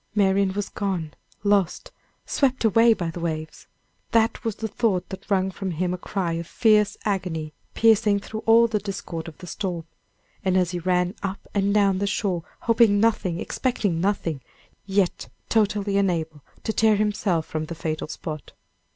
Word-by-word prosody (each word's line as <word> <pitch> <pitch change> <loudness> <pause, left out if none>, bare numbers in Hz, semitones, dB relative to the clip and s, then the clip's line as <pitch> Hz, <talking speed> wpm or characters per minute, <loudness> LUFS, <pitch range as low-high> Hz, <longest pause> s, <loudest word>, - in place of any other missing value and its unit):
Marian 195 -1 +3
was 205 0 -2
gone, 180 -7 -3 0.3
lost, 200 -4 +1 0.3
swept 260 -4 +1
away 225 +2 +5
by 175 -4 -3
the 175 - -7
waves! 155 -2 -4 0.5
that 225 +2 +2
was 225 -3 -2
the 220 - -3
thought 205 -4 0
that 190 +2 -9
wrung 190 -1 +2
from 190 +1 -4
him 180 +1 -1
a - - -3
cry 180 -3 -2
of 165 0 -4
fierce 210 -2 +3
agony, 180 -7 -2 0.2
piercing 220 -2 +4
through 215 +2 -6
all 230 +1 +7
the 220 -2 0
discord 190 -5 -5
of 160 - -10
the - - -10
storm, 175 -2 -4 0.6
as 185 -2 +2
he 175 - -3
ran 180 +1 +1
up 195 0 -5
and 200 0 +2
down 200 -2 +3
the 200 - 0
shore, 190 -3 -1 0.2
hoping 225 -3 +4
nothing, 200 -6 +1
expecting 205 -10 -1
nothing, 175 -7 -1 0.5
yet 195 -2 0 0.2
totally 210 -2 +1
unable 165 -6 0 0.2
to 220 - -1
tear 220 -1 +4
himself 205 -5 0
from 155 0 -3
the 170 - -6
fatal 155 -1 -3
spot. 155 -1 -7
195 Hz, 165 wpm, -24 LUFS, 175-210 Hz, 0.6 s, all